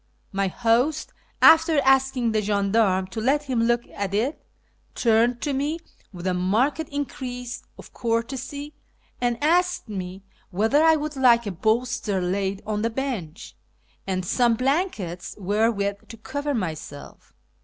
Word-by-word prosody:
My 195 -1 0
host, 245 - +1 0.3
after 325 -1 +7
asking 265 -3 +3
the 215 -1 +1
gendarme 200 -1 +2
to 220 - -4
let 280 +5 +2
him 255 -5 -1
look 240 +1 +2
at 200 -1 -3
it, 250 +9 -1 0.5
turned 235 +1 +2
to 290 - -1
me 290 +4 -1 0.3
with 180 -2 -9
a 185 - +1
marked 230 - +1
increase 250 -3 -5 0.2
of - - -13
courtesy, 265 +5 -3 0.5
and 240 -1 +1
asked 355 -3 +2
me 190 -1 -6 0.3
whether 220 - +2
I 320 0 +6
would 305 0 -3
like 240 -3 +4
a 205 - -2
bolster 220 +1 0
laid 190 +2 -2
on 210 -1 -2
the 230 - +1
bench 225 - -5 0.5
and 185 -1 -1
some 240 +4 +2
blankets 255 - -2
wherewith 200 0 0
to 230 - -10
cover 285 +5 -3
myself. 155 -8 -6
230 Hz, 140 wpm, -24 LUFS, 200-270 Hz, 0.5 s, after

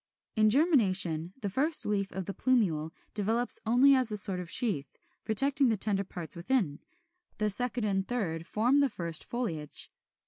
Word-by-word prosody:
In 215 -1 +3
germination 195 - +3
the 205 - -3
first 300 - +4
leaf 200 -2 -2
of 190 -1 -5
the 200 - -5
plumule 180 -13 0 0.2
develops 225 +4 0
only 255 +5 +5
as 255 -4 +1
a 210 - -1
sort 195 -2 +1
of 180 -2 -7
sheath, 160 - -3 0.3
protecting 270 +4 +2
the 220 - 0
tender 200 0 0
parts 175 -3 -5
within; 170 - -1 0.6
the 215 -1 0
second 245 +2 -1
and 195 -2 0
the - - -27
third 170 -9 -4
form 240 +8 +1
the 280 -1 +2
first 170 -6 -3
foliage. 165 - -3
210 Hz, 170 wpm, -29 LUFS, 180-245 Hz, 0.6 s, only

